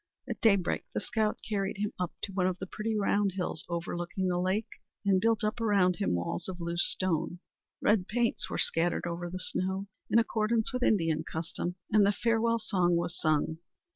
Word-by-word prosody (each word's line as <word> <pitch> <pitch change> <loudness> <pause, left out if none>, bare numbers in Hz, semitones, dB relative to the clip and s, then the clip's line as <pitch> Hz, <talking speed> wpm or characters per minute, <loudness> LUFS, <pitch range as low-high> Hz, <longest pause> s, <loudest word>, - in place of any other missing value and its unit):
At - - -5
daybreak 200 -5 +3
the - - +2
scout 215 -2 0
carried 200 -2 -1
him 210 +1 -2
up 180 -1 -1
to 195 - -3
one 185 -1 +2
of 185 -1 -1
the 190 - -5
pretty 215 +3 -2
round 205 -1 +2
hills 180 -4 -1
overlooking 175 +2 -2
the 175 -1 +1
lake, 190 +4 -1 0.2
and 190 -2 +4
built 225 -1 +2
up 215 +2 -1
around 195 -5 +3
him 200 - +1
walls 90 - -3
of 180 -1 -6
loose 170 0 0
stone. 175 -1 0 0.5
Red 205 -3 +3
paints 235 +1 0
were - - -3
scattered 170 +2 +1
over 175 0 -3
the 185 - -5
snow, 190 +1 -2 0.2
in - - +4
accordance 225 0 +2
with 250 - -1
Indian 165 -9 +2
custom, 170 +2 -4 0.2
and 215 -1 +6
the 200 - +5
farewell 230 +3 +2
song 185 -6 +1
was 170 0 -1
sung. 155 0 +1
190 Hz, 190 wpm, -30 LUFS, 175-215 Hz, 0.5 s, and